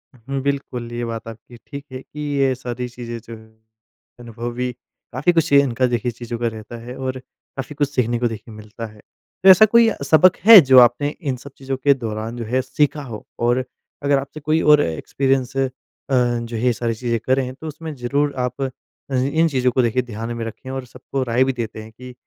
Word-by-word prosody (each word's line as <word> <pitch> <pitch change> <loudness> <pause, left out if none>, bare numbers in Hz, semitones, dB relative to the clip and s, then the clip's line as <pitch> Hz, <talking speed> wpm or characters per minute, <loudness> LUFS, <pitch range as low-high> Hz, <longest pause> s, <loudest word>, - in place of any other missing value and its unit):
हुँ, 135 +3 -5
बिल्कुल। 130 -4 -3
ये 120 0 -3
बात 115 -1 -6
आपकी 115 +2 -11
ठीक 140 -1 -8
है 130 0 -7
कि 150 - -13
ये 140 -3 +1
सारी 125 0 -5
चीज़ें 120 -1 -7
जो 115 0 -10
है, 110 - -16 0.7
अनुभवी, 120 +1 -4 0.4
काफ़ी 140 +8 +2
कुछ 165 -2 +1
ये 140 - +8
इनका 130 -1 0
देखिए 120 0 -1
चीज़ों 120 0 -6
का 120 - 0
रहता 110 +1 -7
है, 125 - -7
और 130 0 -3
काफ़ी 135 +2 -10
कुछ 145 -1 0
सीखने 120 -4 0
को 120 - +2
देखिए 110 0 -8
मिलता 110 +2 -8
है। 105 - -18 0.4
तो 190 - +8
ऐसा 190 +3 +9
कोई 230 +1 +5 0.2
सबक 175 +3 +5
है 225 -2 +12
जो 130 -2 +7
आपने 125 +4 +4
इन 140 -5 -1
सब 140 +3 -12
चीज़ों 135 0 -4
के 140 +2 +4
दौरान 115 -1 -5
जो 115 - -4
है 130 +4 0
सीखा 145 +3 0
हो? 115 -5 -8
और 120 +2 +2 0.4
अगर 140 -1 +3
आपसे 140 +3 -8
कोई 155 +2 +1
और 150 -1 +6
एक्सपीरियंस 130 - -1
अ, 135 -1 +1 0.4
जो 120 -2 +1
है 110 - -3
ये 125 -1 +3
सारी 115 0 -2
चीज़ें 115 0 -1
करें, 130 -1 +1
तो 160 - -9
उसमें 155 +1 -7
ज़रूर 140 +3 0
आप 125 +2 -2
अज 130 0 -4
इन 165 +1 +4
चीज़ों 130 -2 +1
को 130 - +2
देखिए 120 +1 +1
ध्यान 115 0 -6
में 115 - -3
रखें, 115 +3 -8
और 130 -1 -5
सबको 130 +2 -5
राय 120 +1 +2
भी 135 - 0
देते 115 -3 -5
हैं 110 - -13
कि 125 +2 -11
125 Hz, 215 wpm, -21 LUFS, 120-140 Hz, 0.7 s, है